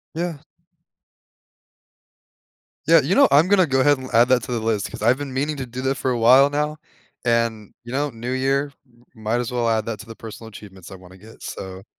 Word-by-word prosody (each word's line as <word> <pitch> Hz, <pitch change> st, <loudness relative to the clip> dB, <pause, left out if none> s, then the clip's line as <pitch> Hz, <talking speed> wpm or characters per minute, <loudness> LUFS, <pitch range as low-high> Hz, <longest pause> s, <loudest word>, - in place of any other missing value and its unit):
Yeah. 170 Hz, -2 st, -3 dB, 2.5 s
Yeah. -, -, +6 dB
You -, -, 0 dB
know, 280 Hz, 0 st, +6 dB
I'm 150 Hz, +5 st, +5 dB
gonna 190 Hz, -2 st, +4 dB
go 135 Hz, -1 st, +1 dB
ahead 145 Hz, +1 st, +4 dB
and 130 Hz, 0 st, -9 dB
add 120 Hz, +2 st, +5 dB
that 125 Hz, -3 st, +3 dB
to -, -, -7 dB
the 120 Hz, -, -1 dB
list 110 Hz, -3 st, -1 dB
'cause -, -, -9 dB
I've 120 Hz, +4 st, +3 dB
been 145 Hz, -2 st, -6 dB
meaning 145 Hz, +3 st, -2 dB
to 130 Hz, -, -4 dB
do 125 Hz, +1 st, -7 dB
that 135 Hz, +1 st, 0 dB
for 130 Hz, -, -2 dB
a 120 Hz, -, -1 dB
while 130 Hz, +5 st, +6 dB
now. 150 Hz, +1 st, -2 dB, 0.5 s
And, 115 Hz, -3 st, -1 dB
you 120 Hz, -, -10 dB
know, 145 Hz, +2 st, -1 dB
new 120 Hz, +1 st, -6 dB
year, 135 Hz, +2 st, 0 dB, 0.4 s
m 110 Hz, -, -15 dB
might 115 Hz, +3 st, 0 dB
as 120 Hz, -, -5 dB
well 120 Hz, -1 st, -1 dB
add 110 Hz, -1 st, 0 dB
that 110 Hz, -2 st, -4 dB
to 110 Hz, -, -10 dB
the 115 Hz, -1 st, -11 dB
personal 115 Hz, 0 st, -10 dB
achievements 95 Hz, -3 st, -13 dB
I -, -, -8 dB
wanna 95 Hz, 0 st, -15 dB
get, 110 Hz, +4 st, -16 dB
so 95 Hz, 0 st, -8 dB
125 Hz, 220 wpm, -22 LUFS, 110-140 Hz, 2.5 s, Yeah